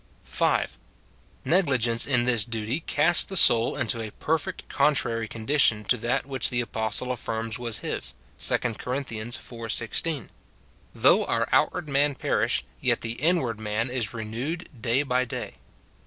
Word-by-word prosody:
5. - - 0 0.7
Negligence 130 - +2
in 125 -4 +2
this 120 -4 +2
duty 115 +5 -3
casts 160 +1 +4
the 190 - -3
soul 115 -7 +5
into 120 -4 -1
a 110 - -5
per 160 +9 -1
fect - - -8
contrary 130 -6 +1
condition 115 -1 +2
to 115 - +4
that 120 +3 -1
which 135 -3 +1
the 120 - -1
apostle 115 +1 0
affirms 115 -1 -2
was 115 -3 -3
his, 65 +1 -2 0.2
2 - - +2 0.2
Cor. 125 - -3
iv. 115 -2 -4
16, 140 +4 -1 0.3
" - - -31
Though - - +4
our - - 0
outward - - +2
man 140 0 +1
perish, - - 0 0.2
yet - - 0
the 115 - -3
inward 130 -3 0
man 110 +3 -1
is 120 -6 -2
renewed 120 +10 -5
day 125 +4 +1
by 125 -2 +1
day." 130 - -6
120 Hz, 155 wpm, -26 LUFS, 115-140 Hz, 0.7 s, soul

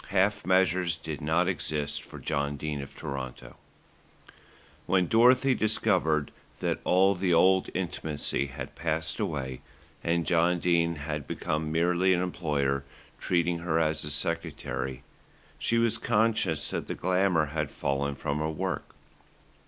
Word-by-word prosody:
Half 95 -1 +1
measures 95 -2 +3
did 80 -1 -6
not 80 +4 +2
exist 75 -5 -1
for - - -11
John 70 0 -2
Dene 75 0 -3
of 70 - -10
Toronto. 65 -2 -6 1.3
When 90 0 +3
Dorothy 125 +6 +5
discovered 90 - +1 0.3
that - - -1
all 95 +2 +4
the 90 -2 +1
old 95 +2 +4
intimacy 80 -6 -1
had 65 -1 -7
passed 80 0 -1
away, 65 -3 -3 0.4
and 85 0 +1
John 90 0 +3
Dene 85 -1 +2
had 75 -1 -5
become 75 0 -2
merely 90 +3 +3
an - - 0
employer, 70 -6 -1 0.4
treating 85 -1 +1
her 85 -1 0
as 80 -1 +1
a 75 - -4
secretary, 75 -4 -2 0.6
she 115 - +1
was 115 -1 +2
conscious 105 -8 +1
that - - -4
the - - -3
glamour 90 -3 +2
had 75 -3 -1
fallen 70 +1 -2
from 70 +1 -2
her 75 0 -1
work. 80 - -4
80 Hz, 135 wpm, -28 LUFS, 75-90 Hz, 1.3 s, Dorothy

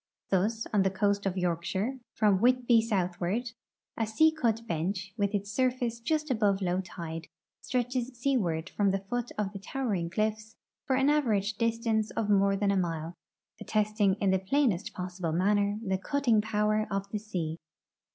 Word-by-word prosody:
Thus, 215 +4 +1
on 205 - +4
the 190 - +3
coast 200 +1 0
of 190 0 -2
Yorkshire, 180 +8 -1 0.2
from 205 -3 +3
Whitby 245 -1 +4
southward, 195 +2 -1 0.4
a 225 - -1
sea 315 +9 +4
cut 230 -7 0
bench, 185 +1 -2
with 205 -1 0
its 200 0 -3
surface 245 -1 0
just 305 +4 -1
above 205 -5 +2
low 185 -1 0
tide, 170 -3 -7 0.3
stretches 250 -1 -1
seaward 195 -11 0
from 205 -1 +2
the 195 - +1
foot 245 0 -2
of 205 -1 -2
the 200 - -6
towering 200 -6 -2
cliffs 215 +3 -2 0.3
for 265 - +2
an 270 +2 +3
average 220 -8 +1
distance 225 -1 0
of 210 -2 +1
more 195 0 +4
than 200 0 +1
a 200 - +1
mile, 165 -2 -2 0.5
attesting 210 -2 +1
in 200 -2 +1
the 190 - +3
j)lainest 215 -1 +1
possilde 180 -3 -3
manner 205 +2 +2
the 190 -1 0
cutting 245 -2 +2
power 215 0 +1
of 195 0 -2
the 210 - -2
sea. 170 -7 -4
210 Hz, 165 wpm, -29 LUFS, 190-230 Hz, 0.5 s, on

